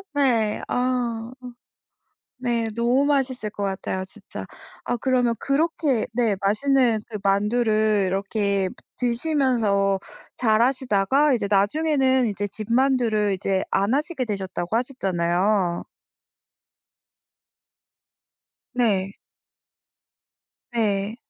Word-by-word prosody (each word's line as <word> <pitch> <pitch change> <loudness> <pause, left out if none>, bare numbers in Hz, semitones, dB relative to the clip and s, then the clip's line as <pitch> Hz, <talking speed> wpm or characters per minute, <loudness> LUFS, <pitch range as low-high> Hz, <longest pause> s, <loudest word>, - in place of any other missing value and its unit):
네. 235 -7 +2
아. 245 -2 -1 1.1
네. 235 -2 0
너무 240 +4 +2
맛있을 260 -6 0
것 205 -1 -4
같아요 190 -1 -3
진짜. - - -9 0.4
아 245 - -1
그러면 245 -1 +1
그렇게 285 -3 0
네 225 -4 +1
맛있는 235 +3 +2
그 210 - -4
만두를 215 0 +2
이렇게 195 0 0 0.3
드시면서 235 -7 +1 0.4
잘 220 -1 +3
하시다가 260 +2 +2
이제 205 -4 -1
나중에는 260 +4 +2
이제 205 0 -3
집 215 +3 -6
만두를 235 -6 +2
이제 190 0 -1
안 200 +5 +1
하시게 295 -1 -1
되셨다고 195 -2 -4
하셨잖아요. 190 -6 0 2.9
네. 200 -6 +1 1.6
네. 210 -2 0
225 Hz, 195 characters per minute, -23 LUFS, 200-255 Hz, 2.9 s, 잘